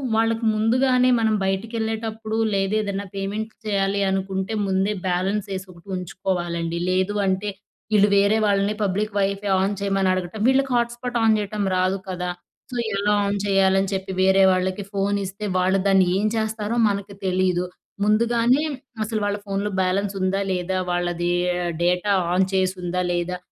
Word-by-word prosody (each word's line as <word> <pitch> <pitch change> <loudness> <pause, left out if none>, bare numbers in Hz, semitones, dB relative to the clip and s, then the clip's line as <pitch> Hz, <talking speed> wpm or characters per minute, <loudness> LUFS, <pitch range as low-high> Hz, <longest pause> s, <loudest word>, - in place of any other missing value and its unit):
వాళ్ళకి 225 +1 +1
ముందుగానే, 250 +3 +3
మనం 220 -1 +2
బయటికి 195 +5 -2
ఏళ్ళేటప్పుడు 220 0 -3 0.2
లేదేదనా 200 0 0
పేమెంట్ 205 +3 -3
చేయాలి 200 -1 0
అనుకుంటే, 190 +2 -2
ముందే 190 +2 +1
బ్యాలెన్స్ 190 +3 0
వేసి 190 0 -4
ఒకటుంచుకోవాలండి. 175 -2 -3
లేదు 185 +2 +1
అంటే, 190 +2 0 0.5
ఇళ్ళు 205 0 +6
వేరే 200 +2 +4
వాళ్ళని, 200 +1 +2
పబ్లిక్ 205 +2 -1
వైఫై 200 +1 -1
ఆన్ 200 +1 0
చేయమని 195 -1 +1
అడగటం 185 +3 -4
వీళ్ళకి 270 0 +2
హాట్ 235 0 +1
స్పాట్ 245 0 -3
ఆన్ 220 -1 +4
చేయటం 205 0 -2
రాదు 185 +1 +1
కదా! 180 -1 -3 0.4
సో, - - -5 0.2
ఎలా 205 +1 +2
ఆన్ 200 0 0
చేయాలని 195 0 +3
చెప్పి, 190 0 -3
వేరే 190 0 +5
వాళ్ళకి 185 +2 -1
ఫోన్ 200 +1 0
ఇస్తే, 195 +3 -6
వాళ్ళు 185 +1 +2
దాన్ని 190 -2 +4
ఏం 205 - 0
చేస్తారో 220 +1 -2
మనకి 200 0 -4
తెలీదు. 185 -1 +1 0.4
ముందుగానే 235 +5 +3 0.4
అసలు, 215 0 -2
వాళ్ళ 205 0 0
ఫోన్‌లో 200 +1 -2
బ్యాలెన్స్ 195 +2 0
ఉందా, 190 +1 +1
లేదా? 185 +1 -1
వాళ్ళది 175 0 -1 0.3
ఆహ్, 175 -1 -1
డేటా 180 +3 +1 0.2
ఆన్ 185 +1 +3
చేసి 190 0 +1
ఉందా, 180 +1 -1
లేదా? 175 +1 -2
195 Hz, 150 wpm, -23 LUFS, 185-215 Hz, 0.5 s, ఇళ్ళు